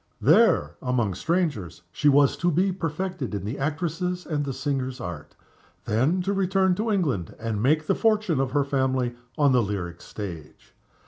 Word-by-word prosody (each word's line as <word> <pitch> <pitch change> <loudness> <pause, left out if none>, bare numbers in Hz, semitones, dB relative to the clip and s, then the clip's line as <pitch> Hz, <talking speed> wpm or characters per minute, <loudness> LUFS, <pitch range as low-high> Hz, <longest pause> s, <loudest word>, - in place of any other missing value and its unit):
There, 210 - +4
among 120 -6 0
strangers, 150 - -2
she 145 - +2
was 140 -1 +4
to 175 - +1
be 180 +4 +2
perfected 175 - -3
in 100 - -4
the 115 +7 -4
actress's 170 +5 -2
and 150 -3 -1
the 140 - -2
singer's 135 -1 -3
art; 80 -8 -7 0.5
then 145 - +1
to 195 +2 0
return 190 -1 +2
to 215 +5 -2
England, 145 - -1
and 110 -2 -3
make 155 +5 +2
the - - +2
fortune 215 - +1
of 135 -1 +1
her 140 +2 +1
family 130 -3 0 0.2
on 145 -3 +4
the 125 -1 +4
lyric 90 -5 -4
stage. 85 -8 -9
140 Hz, 170 wpm, -25 LUFS, 120-180 Hz, 0.5 s, There